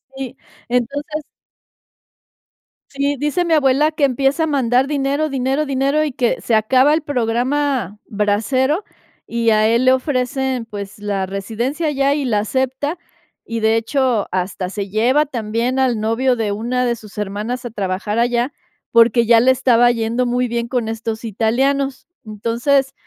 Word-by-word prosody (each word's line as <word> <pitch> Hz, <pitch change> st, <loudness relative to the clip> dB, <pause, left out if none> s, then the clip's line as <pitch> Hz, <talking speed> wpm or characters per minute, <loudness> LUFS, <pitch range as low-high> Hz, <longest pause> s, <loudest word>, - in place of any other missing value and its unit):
Sí, 265 Hz, -3 st, -6 dB, 0.3 s
entonces 285 Hz, +5 st, -2 dB, 1.7 s
sí, 280 Hz, +1 st, -1 dB
dice 295 Hz, +6 st, 0 dB
mi 330 Hz, -, +1 dB
abuela 295 Hz, +1 st, +3 dB
que 305 Hz, -2 st, -3 dB
empieza 275 Hz, +4 st, +2 dB
a -, -, +1 dB
mandar 260 Hz, -2 st, +2 dB
dinero, 285 Hz, +1 st, 0 dB
dinero, 270 Hz, +3 st, 0 dB
dinero, 275 Hz, +3 st, +1 dB
y 300 Hz, -, -2 dB
que 245 Hz, -1 st, 0 dB
se 230 Hz, -, -2 dB
acaba 260 Hz, +7 st, +4 dB
el 315 Hz, -, +1 dB
programa 250 Hz, -, -1 dB
brasero, 255 Hz, -, 0 dB, 0.4 s
y 230 Hz, -1 st, 0 dB
a 215 Hz, 0 st, +4 dB
él 235 Hz, +3 st, +2 dB
le 260 Hz, -, +6 dB
ofrecen, 260 Hz, -2 st, -1 dB
pues, 200 Hz, -2 st, -8 dB
la 200 Hz, -2 st, -2 dB
residencia 235 Hz, -, -3 dB
allá 280 Hz, -1 st, +1 dB
y 290 Hz, -2 st, -1 dB
la 215 Hz, -4 st, +1 dB
acepta, 265 Hz, -, -2 dB, 0.5 s
y 230 Hz, 0 st, -3 dB
de 220 Hz, +1 st, +3 dB
hecho, 245 Hz, -2 st, 0 dB
hasta 185 Hz, 0 st, -2 dB
se 200 Hz, -1 st, -5 dB
lleva 250 Hz, +9 st, +2 dB
también 240 Hz, 0 st, -2 dB
al 245 Hz, -4 st, +1 dB
novio 240 Hz, +4 st, +1 dB
de 220 Hz, -3 st, -1 dB
una 245 Hz, +4 st, -1 dB
de 240 Hz, -1 st, 0 dB
sus 215 Hz, -2 st, -14 dB
hermanas 210 Hz, +5 st, -4 dB
a 235 Hz, -, -5 dB
trabajar 205 Hz, +2 st, -2 dB
allá, 240 Hz, +2 st, +1 dB, 0.4 s
porque 230 Hz, 0 st, +5 dB
ya 230 Hz, 0 st, +6 dB
le 260 Hz, +2 st, +5 dB
estaba 245 Hz, -2 st, +4 dB
yendo 235 Hz, +2 st, -1 dB
muy 245 Hz, +1 st, 0 dB
bien 235 Hz, 0 st, -2 dB
con 240 Hz, -3 st, -1 dB
estos 225 Hz, 0 st, -4 dB
italianos. 260 Hz, +5 st, 0 dB, 0.2 s
Entonces, 235 Hz, +6 st, 0 dB
245 Hz, 155 wpm, -19 LUFS, 225-275 Hz, 1.7 s, le